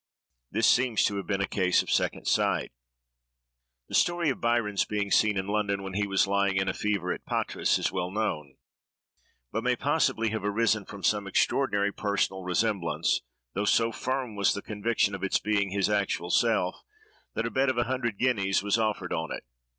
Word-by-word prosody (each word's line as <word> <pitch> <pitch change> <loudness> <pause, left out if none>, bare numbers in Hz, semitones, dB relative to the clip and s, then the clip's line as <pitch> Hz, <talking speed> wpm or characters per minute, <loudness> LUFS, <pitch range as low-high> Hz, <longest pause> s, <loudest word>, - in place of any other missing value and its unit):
This 110 +3 +1
seems 125 -3 +3
to 100 - 0
have 100 - -5
been 100 -2 0
a 100 - 0
case 90 -2 +2
of - - -6
second - - 0
sight. - - +1 1.2
The - - -13
story 175 -3 +2
of 130 - -6
Byron's 115 -4 +1
being 105 -1 -3
seen 105 -2 +3
in 95 - -1
London 100 -1 -1
when 95 -1 -6
he 100 +1 0
was 95 -1 +2
lying 100 0 +1
in 95 0 +1
a 95 - 0
fever 100 -4 -1
at - - -9
Patras, - - 0
is - - -1
well 90 -1 -2
known; 75 -9 -3 0.9
but - - -2
may - - +2
possibly 115 0 +1
have 110 -2 -3
arisen 105 0 +1
from 100 -1 -10
some 105 +2 +1
extraordinary 100 -1 +1
personal 100 -2 -1
resemblance, 90 -1 0 0.3
though 100 - -1
so 115 +2 +3
firm 130 -1 -3
was 100 -1 +2
the 100 - -5
conviction 105 -1 0
of 95 - -5
its 95 - +2
being 100 -1 0
his 100 0 +1
actual 100 -4 -1
self, 110 -6 +1 0.5
that - - -1
a - - -2
bet 135 0 +2
of 130 - -1
a 120 - +3
hundred 120 -4 -2
guineas 100 -6 +1
was 105 +2 +1
offered 105 -5 -1
on 80 0 -3
it. - - -5
100 Hz, 190 wpm, -28 LUFS, 95-110 Hz, 1.2 s, seems